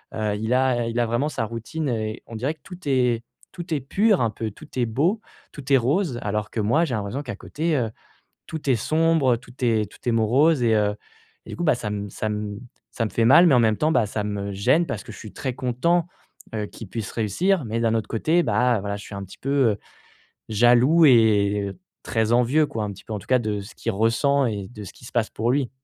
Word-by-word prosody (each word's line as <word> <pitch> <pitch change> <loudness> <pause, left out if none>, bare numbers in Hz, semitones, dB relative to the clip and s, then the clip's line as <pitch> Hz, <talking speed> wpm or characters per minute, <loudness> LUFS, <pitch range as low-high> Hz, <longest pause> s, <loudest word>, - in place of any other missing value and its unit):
Heu, 105 -1 -1
il 110 +3 -1
a 125 -2 +2
il 115 +1 -2
a 120 - +3
vraiment 120 +6 0
sa 115 - -2
routine 120 +7 -4
et 110 -1 -3
on 115 - -9
dirait 135 +8 -2
que 150 - -40
tout 180 -1 -10
est 125 -4 +2 0.3
tout 175 -1 -5
est 145 - 0
pur 200 - +2
un 115 - +2
peu, 110 -1 -4
tout - - -14
est 120 - +2
beau, 160 - +1 0.3
tout 140 -1 -3
est 135 - +8
rose 135 +1 0
alors 105 0 -2
que 110 - -2
moi, 135 +11 +2
j'ai 130 -7 -2
l'impression 105 +6 -3
qu'à 120 -6 -6
côté, 160 +9 -2
heu, 115 -3 -1 0.6
tout 155 -3 -5
est 130 - +5
sombre, 155 -2 +2
tout 120 0 -16
est 110 -4 +1
tout - - -16
est - - +2
morose 125 +6 +3
et 115 -2 +3
heu, 105 -1 +1 0.5
du - - -6
coup, 175 - -4
bah, 150 - +4
ça 110 -3 -4
me 105 0 -4
ça 110 - -3
me 105 -1 -4 0.3
ça 115 - -2
me - - -3
fait 115 - +1
mal. 165 +9 +7
Mais 140 - +5
en - - +5
même 110 -2 +3
temps, 155 +1 +1
bah, 120 -8 +3
ça 105 +1 -3
me 100 -1 -3
gêne, 125 - +2
parce 105 - -4
que - - -10
je - - -12
suis 110 -3 -10
très 130 -2 -3
content, 160 +8 +1 0.5
heu, 105 -1 -2
qu'il 110 - -10
puisse 110 -1 -5
réussir. 140 - 0
Mais 110 +1 -2
d'un 115 -1 +2
autre 110 - -1
côté, 155 +10 +2
bah, 125 -2 +2
voilà, 100 0 -3
je 105 - -10
suis 100 - -9
un 100 - -5
petit 95 - -12
peu, 135 - -5 0.2
heu, 100 - -7 0.7
jaloux 120 +9 +5
et 105 -5 +3 0.3
très 115 0 0
envieux, 130 +6 +3
quoi, 110 -1 -4
un 105 - -4
petit 100 - -12
peu, 110 - -6
en 105 - -2
tout - - -14
cas, 130 -1 +4
de 105 -3 -2
ce 100 - -11
qu'il - - -2
ressent 125 +6 +2
et 100 -4 -4
de 105 -3 -10
ce - - -10
qui 120 - -15
se - - -11
passe 115 -2 +1
pour 115 +2 -1
lui. 135 -2 0
120 Hz, 250 wpm, -23 LUFS, 110-140 Hz, 0.7 s, est